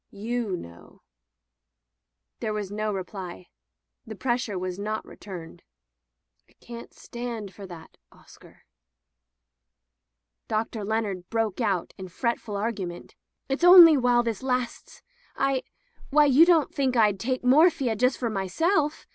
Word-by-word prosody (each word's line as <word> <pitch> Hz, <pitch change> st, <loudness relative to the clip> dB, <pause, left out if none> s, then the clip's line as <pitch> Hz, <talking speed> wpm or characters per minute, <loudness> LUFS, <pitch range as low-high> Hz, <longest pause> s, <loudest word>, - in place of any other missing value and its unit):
''You 220 Hz, -1 st, -3 dB
know/' 85 Hz, -, -13 dB, 1.4 s
There 215 Hz, -, -3 dB
was 205 Hz, -2 st, -4 dB
no 215 Hz, +1 st, -2 dB
reply. 185 Hz, -, -7 dB, 0.6 s
The -, -, -7 dB
pressure 240 Hz, -5 st, -2 dB
was 185 Hz, +1 st, -4 dB
not 215 Hz, +1 st, -3 dB
returned. 175 Hz, -5 st, -10 dB, 0.9 s
"I -, -, -26 dB
can't 235 Hz, 0 st, -11 dB
stand 235 Hz, -5 st, -7 dB
for 200 Hz, -2 st, -10 dB
that, 170 Hz, -3 st, -12 dB
Oscar." -, -, -19 dB, 1.8 s
Dr. 220 Hz, 0 st, -2 dB
Leonard 200 Hz, -4 st, -3 dB
broke 225 Hz, -1 st, -1 dB
out 195 Hz, -6 st, -1 dB
in 190 Hz, -, -7 dB
fretful 225 Hz, +2 st, -3 dB
argu 205 Hz, -2 st, -2 dB
ment: 175 Hz, 0 st, -10 dB, 0.3 s
"It's 270 Hz, +5 st, -3 dB
only 350 Hz, -3 st, +10 dB
while 245 Hz, -2 st, +3 dB
this 230 Hz, -4 st, -3 dB
lasts. 250 Hz, -2 st, -4 dB, 0.3 s
I 275 Hz, -1 st, 0 dB, 0.3 s
— 480 Hz, -, -26 dB
^why, 295 Hz, -1 st, +4 dB
you 320 Hz, +6 st, +7 dB
don't 330 Hz, -5 st, +3 dB
think 265 Hz, -2 st, 0 dB
Fd 210 Hz, -4 st, +3 dB
take 255 Hz, +5 st, -2 dB
morphia 275 Hz, -2 st, +4 dB
just 250 Hz, +4 st, +1 dB
for 235 Hz, -3 st, -2 dB
my 195 Hz, -2 st, -2 dB
self! 315 Hz, -, 0 dB
225 Hz, 135 wpm, -26 LUFS, 195-255 Hz, 1.8 s, only